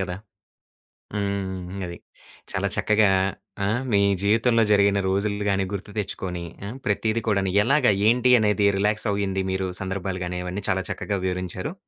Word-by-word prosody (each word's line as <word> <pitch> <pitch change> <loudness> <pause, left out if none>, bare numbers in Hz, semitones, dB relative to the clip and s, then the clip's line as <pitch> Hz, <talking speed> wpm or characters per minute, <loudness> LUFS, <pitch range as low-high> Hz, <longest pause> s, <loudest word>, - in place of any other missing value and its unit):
కదా! 90 -1 -3 1.0
హ్మ్. 95 -2 -3
అది. 85 - -7 0.5
చాలా - - 0
చక్కగా 105 -1 +3 0.6
ఆహ్, 110 +5 0
మీ 100 - +5 0.2
జీవితంలో 115 +3 +3
జరిగిన 100 -1 +4
రోజులు 100 +2 0
గాని, 95 -1 +1
గుర్తు 100 +1 -5
తెచ్చుకొని 90 -3 -4 0.2
ఆహ్, 115 +6 -7
ప్రతీది 110 +2 0
కూడాను 100 -3 +1
ఎలాగా? 135 0 +4 0.2
ఏంటి? 125 +1 +3
అనేది 105 -1 +2
రిలాక్స్ 105 +2 +2
అయింది 95 -1 -1
మీరు 95 0 -1
సందర్భాలు 95 -1 -3
గాని 90 0 -4
అవన్నీ 95 +3 -4
చాలా 95 0 +1
చక్కగా 100 +1 -2
వివరించారు. 90 - -3
100 Hz, 140 wpm, -24 LUFS, 95-105 Hz, 1.0 s, మీ